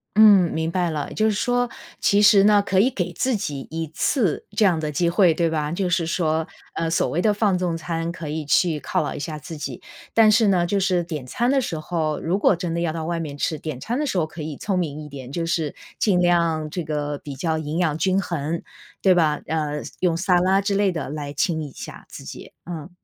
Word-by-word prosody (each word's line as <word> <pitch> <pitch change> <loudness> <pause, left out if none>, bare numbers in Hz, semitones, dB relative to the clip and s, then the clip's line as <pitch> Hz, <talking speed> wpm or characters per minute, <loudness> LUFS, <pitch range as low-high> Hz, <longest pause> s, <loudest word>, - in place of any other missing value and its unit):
嗯， 205 -5 +7
明 160 +1 -1
白 180 -1 0
了。 150 -2 -3
也 - - -9
就 215 - +1
是 - - +2
说， 245 +2 +1 0.3
其 205 +1 +3
实 205 -2 +7
呢， 210 -1 +6
可 190 - +2
以 230 +7 +5
给 180 -8 -3
自 255 +7 0
己 145 -8 -4
1 160 0 -3
次 205 - 0
这 215 - +4
样 175 -5 +3
的 155 -1 -2
机 170 +4 +1
会， 175 0 +4
对 170 +1 +1
吧？ 155 -1 -1
就 180 +1 -1
是 170 -1 +1
说， 160 -2 0 0.3
呃， 165 0 -1
所 165 - +1
谓 175 - 0
的 215 - +3
放 205 -3 +2
纵 175 -2 -1
餐 165 0 -3
可 170 -3 -7
以 155 +1 -3
去 160 +1 +2
犒 - - -1
劳 - - -3
一 - - -6
下 155 +1 -4
自 160 +3 -8
己。 150 - -5 0.4
但 220 -1 +6
是 220 0 +4
呢， 180 -3 +3
就 200 +3 0
是 185 -2 +1
点 155 -6 -5
餐 240 - 0
的 275 -1 +3
时 180 -9 -3
候 155 -1 -2
如 180 +5 -1
果 200 - +4
真 170 -1 -3
的 170 - -1
要 170 -2 0
到 160 0 -4
外 170 0 -2
面 145 -3 -5
吃， 155 +1 -1
点 155 -5 -5
餐 240 - -2
的 300 - 0
时 195 - -1
候 165 - +2
可 155 +1 -9
以 150 -2 -5
聪 195 -3 -1
明 155 -3 -3
一 - - -9
点。 135 -2 -9
就 165 +3 -2
是 165 -3 -1 0.2
尽 195 -5 +3
量 170 -3 +2
这 175 -1 -3
个 150 -1 -3
比 145 -3 -8
较 160 +3 -1
营 155 +1 -4
养 165 -4 +1
均 190 +3 +2
衡， 165 -3 -3 0.4
对 190 - +6
吧？ 155 -4 +2
呃， 150 -2 -2 0.2
用 175 -3 +1
撒 180 0 +3
拉 190 +2 +3
之 200 0 -1
类 200 -1 +2
的 160 -6 -4
来 145 -2 -5
清 160 +2 0
理 150 - -4
一 140 - -12
下 - - -9
自 - - -10
己， - - -10
嗯。 170 -2 -6
170 Hz, 265 characters per minute, -23 LUFS, 155-190 Hz, 0.4 s, 嗯